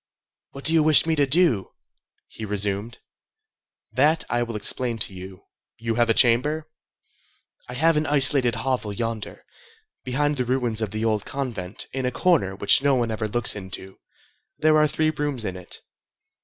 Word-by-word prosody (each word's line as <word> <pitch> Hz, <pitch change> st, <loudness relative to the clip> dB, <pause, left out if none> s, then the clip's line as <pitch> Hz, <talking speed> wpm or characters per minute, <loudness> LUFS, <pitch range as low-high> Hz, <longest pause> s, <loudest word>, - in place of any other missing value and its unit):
"What 140 Hz, -, -12 dB
do 160 Hz, -, +6 dB
you 165 Hz, -, +4 dB
wish 155 Hz, 0 st, +8 dB
me 160 Hz, -1 st, 0 dB
to 145 Hz, -2 st, +1 dB
do?" 135 Hz, -, +2 dB, 0.5 s
he 110 Hz, -, -11 dB
resumed. 105 Hz, +2 st, -3 dB, 0.9 s
"That 150 Hz, +7 st, +1 dB
I 120 Hz, -, 0 dB
will 115 Hz, -1 st, -4 dB
explain 115 Hz, +3 st, -1 dB
to 105 Hz, -, -1 dB
you. 95 Hz, 0 st, -11 dB, 0.3 s
You 115 Hz, 0 st, -3 dB
have 120 Hz, 0 st, 0 dB
a -, -, +4 dB
chamber?" 145 Hz, +6 st, +2 dB, 1.0 s
"I 125 Hz, -, -7 dB
have 165 Hz, +4 st, +2 dB
an 155 Hz, +1 st, -1 dB
isolated 135 Hz, -4 st, +5 dB
hovel 130 Hz, -5 st, -3 dB
yonder, 115 Hz, 0 st, -6 dB, 0.6 s
behind 145 Hz, +3 st, -1 dB
the 125 Hz, -, -2 dB
ruins 120 Hz, -3 st, -2 dB
of 110 Hz, -, -2 dB
the 110 Hz, +3 st, -4 dB
old 110 Hz, -2 st, -1 dB
convent, 115 Hz, -9 st, -6 dB
in 130 Hz, -1 st, -3 dB
a -, -, -2 dB
corner 125 Hz, -, 0 dB
which 100 Hz, +5 st, +3 dB
no 140 Hz, -1 st, +2 dB
one 120 Hz, -2 st, -1 dB
ever 110 Hz, 0 st, -3 dB
looks 120 Hz, +2 st, 0 dB
into. 95 Hz, -1 st, -9 dB, 0.6 s
There 155 Hz, 0 st, +2 dB
are 150 Hz, -, +3 dB
three 155 Hz, +1 st, -1 dB
rooms 145 Hz, -6 st, -4 dB
in 95 Hz, -, -4 dB
it." 90 Hz, -1 st, -9 dB
120 Hz, 170 wpm, -23 LUFS, 110-145 Hz, 1.0 s, wish